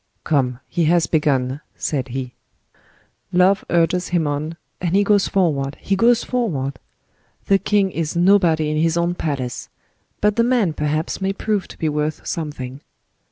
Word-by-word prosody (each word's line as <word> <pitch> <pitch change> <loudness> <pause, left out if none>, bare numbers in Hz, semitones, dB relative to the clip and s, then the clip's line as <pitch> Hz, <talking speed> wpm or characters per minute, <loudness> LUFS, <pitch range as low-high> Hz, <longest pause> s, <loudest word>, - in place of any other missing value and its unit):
"Come, 130 -5 0
he 170 - 0
has 170 +1 +3
begun," 140 -3 0 0.2
said 135 -4 -2
he. 130 0 -5 1.0
"Love 185 +2 +3
urges 175 +1 +2
him 175 -3 +1
on, 150 +3 -3 0.2
and 175 0 0
he 200 - +4
goes 205 -1 +3
forward—he 155 -1 0
goes 235 +3 +4
forward! 145 - -2 0.7
The 195 -1 +3
king 195 0 +1
is 165 -1 -3
nobody 170 -4 +3
in 155 - -1
his 165 +1 +2
own 170 +1 +1
palace; 140 -8 -4 0.5
but 210 +1 +1
the 230 - +4
man 235 -9 +2
perhaps 150 +4 -2
may 195 0 0
prove 205 -1 -1
to - - -13
be 160 - -1
worth 150 0 -2
something. 145 -4 -5
165 Hz, 155 wpm, -21 LUFS, 145-195 Hz, 1.0 s, he